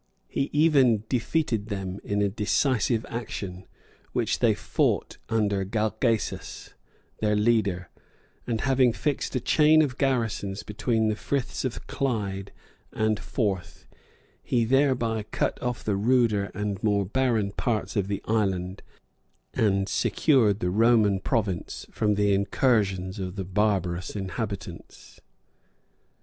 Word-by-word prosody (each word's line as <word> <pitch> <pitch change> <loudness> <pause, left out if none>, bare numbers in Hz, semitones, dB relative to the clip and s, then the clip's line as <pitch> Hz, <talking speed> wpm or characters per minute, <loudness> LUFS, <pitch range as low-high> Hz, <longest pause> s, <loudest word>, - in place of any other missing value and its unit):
He 135 - -2
even 140 -8 +4
defeated 120 -4 0
them 95 -2 -4
in 100 0 0
a - - +3
decisive 110 +2 +1
action, 100 -5 -6 0.5
which - - 0
they - - +3
fought - - -1
under 100 -3 +1
Galgacus, 110 +3 -2 0.5
their 105 -1 +1
leader; 105 -5 +1 0.6
and 115 -2 -1
having 130 -2 +3
fixed 135 +4 -2
a - - +2
chain 155 +5 +5
of 135 -3 -3
garrisons 115 -7 -1
between 110 +1 0
the 110 - +1
Friths 135 +4 -2
of 130 -3 -4
Clyde 100 -7 -2 0.4
and 110 -1 0
Forth, 100 -7 -3 0.6
he 120 -2 +1
thereby 125 -3 +2
cut - - -1
off 125 -2 -3
the 105 - 0
ruder 110 -1 +2
and 105 -1 -3
more 100 -2 +2
barren 110 -2 +1
parts 110 +2 -2
of 100 -3 0
the 100 -1 -3
island, 95 -4 -1 0.7
and 100 -3 +1
secured 110 -9 +2
the 90 - 0
Roman 110 -2 +4
province 95 -3 -2
from 105 -2 +1
the 100 0 +2
incursions 100 -3 +1
of 90 -1 -4
the 95 -2 -4
barbarous 95 -2 0
inhabitants. 95 -3 -6
105 Hz, 125 wpm, -26 LUFS, 100-120 Hz, 0.7 s, chain